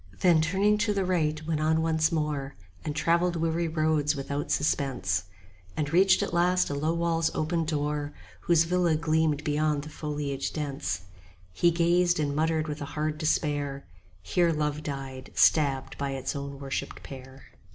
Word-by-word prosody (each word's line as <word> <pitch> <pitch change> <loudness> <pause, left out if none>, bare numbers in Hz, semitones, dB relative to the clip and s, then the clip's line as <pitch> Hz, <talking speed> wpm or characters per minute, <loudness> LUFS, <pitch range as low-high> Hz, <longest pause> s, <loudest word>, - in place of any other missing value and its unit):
Then 170 -4 +5
turning 195 +6 +2
to 210 -1 +1
the 195 -1 0
right 155 -4 0
went 160 -1 -1
on 160 +1 +2
once 160 0 +2
more 150 -4 -2 0.3
And 150 - -4
travelled 170 +2 +2
weary 165 +1 0
roads 155 -2 +1
without 140 +1 -4
suspense; 125 - 0 0.5
And 150 0 -2
reached 190 +2 +5
at - - -4
last 180 -1 +2
a - - -1
low 155 +4 0
wall's 165 -1 +1
open 165 +1 0
door, 150 -1 -2
15 - - -20
Whose 170 -2 +4
villa 175 -1 +2
gleamed 155 -1 +1
beyond 150 -1 0
the 150 - -8
foliage 145 -3 -4
dense: 140 - -3 0.5
He 175 - +3
gazed, 175 +1 +2
and 145 -2 -1
muttered 160 0 +1
with 150 0 -5
a - - -3
hard 155 0 -1
despair, 145 -3 -1 0.4
Here 170 - +2
Love 150 -1 -1
died, 135 -3 -6
stabbed 140 -4 +3
by 140 -1 -2
its 135 +1 -3
own 140 0 -5
worshipped 135 -1 -5
pair. 130 0 -11
155 Hz, 165 wpm, -27 LUFS, 145-165 Hz, 0.5 s, Then